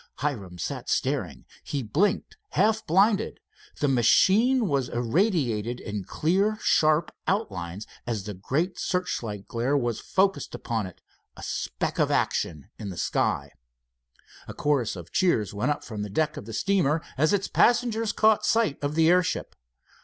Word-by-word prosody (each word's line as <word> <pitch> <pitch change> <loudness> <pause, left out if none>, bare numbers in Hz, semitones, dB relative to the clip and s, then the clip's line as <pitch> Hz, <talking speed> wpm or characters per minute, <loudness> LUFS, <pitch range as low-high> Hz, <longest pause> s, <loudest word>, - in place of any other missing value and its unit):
Hiram 100 -12 -3
sat 80 - -4
staring. - - -1 0.2
He 140 -3 -3
blinked, 155 - 0 0.2
half 220 0 +2
blinded. 200 +5 +2 0.4
The 145 - +3
machine 200 - +4
was 135 -5 0
irradiated 120 - 0
in 105 -3 -5
clear, 195 +7 +1
sharp 155 -5 +3 0.2
outlines 95 - -2 0.2
as 110 -5 -2
the 105 +1 -5
great 150 - -2
searchlight 115 - -2
glare 125 +5 0
was 120 -4 -1
focused, 195 0 0
a 110 -7 -3 0.5
speck - - -3
of - - +3
action 75 -4 -1
in 100 - -5
the 90 - -7
sky. - - 0 1.0
A - - -8
chorus 140 -8 0
of 85 -2 -10
cheers 170 - +1
went 105 +7 -1
up 145 - -1
from 110 -3 -6
the 105 - -4
deck 155 +8 0
of 145 - -7
the 115 - -7
steamer 170 - +1
as 155 +3 +2
its 200 -1 +1
passengers 230 -2 +2
caught 215 0 +3
sight 225 -12 +1
of 145 +1 -1
the 160 0 +4
airship. 180 0 +1
145 Hz, 145 wpm, -26 LUFS, -, 1.0 s, machine